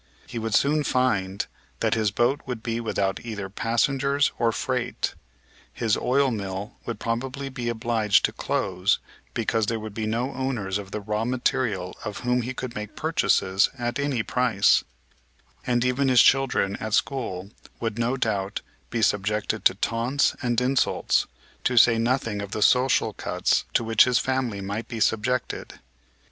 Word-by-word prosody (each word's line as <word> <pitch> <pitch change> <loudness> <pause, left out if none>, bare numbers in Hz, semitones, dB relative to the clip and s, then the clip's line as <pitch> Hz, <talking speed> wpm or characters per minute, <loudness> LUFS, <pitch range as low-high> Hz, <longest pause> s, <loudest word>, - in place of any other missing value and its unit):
He 120 - -5
would 110 -1 -1
soon 150 +2 +3
find 100 -8 0 0.3
that - - +1
his 110 -2 +2
boat 120 +7 +1
would 125 -3 -5
be 115 -1 -2
without 100 -4 -1
either 105 -4 -5
passengers 135 +6 +1
or 115 -1 +3
freight; - - -2 0.6
his 110 -2 0
oil 135 +1 +2
mill 100 -2 -4
would 115 -3 -4
probably 130 +4 -3
be 125 -3 -4
obliged 110 -2 +2
to - - -1
close 90 +3 0 0.4
because 110 -2 0
there 115 0 -1
would 110 -1 -7
be 110 0 -3
no 120 +5 -1
owners 115 -7 -2
of 100 -1 -8
the 105 - -4
raw 105 +2 -2
material 115 -6 -1
of 105 -2 -5
whom 125 0 +1
he 125 +2 -4
could 130 -1 -5
make 105 -2 -6
purchases 100 -11 +2
at 120 +1 -2
any 140 -5 0
price, 120 -6 +3 0.8
and 120 0 +2
even 130 +2 +1
his 125 -2 +6
children 130 -7 +3
at 110 0 -1
school 105 -10 -2 0.3
would, 115 -1 -3
no 120 +3 +1
doubt, 100 -5 -1 0.3
be 115 -1 -1
subjected 105 +1 0
to - - +5
taunts 120 +5 +1
and 120 -2 +1
insults, 130 +1 +1 0.4
to 125 - +1
say 115 0 +6
nothing 115 -3 0
of 100 0 -6
the 105 - +1
social 125 -2 +3
cuts 90 -1 0
to - - +3
which 115 -1 +5
his 125 -1 +2
family 125 -6 -1
might 100 +4 -4
be 115 -2 -5
subjected. 115 +4 -1
115 Hz, 160 wpm, -25 LUFS, 105-125 Hz, 0.8 s, his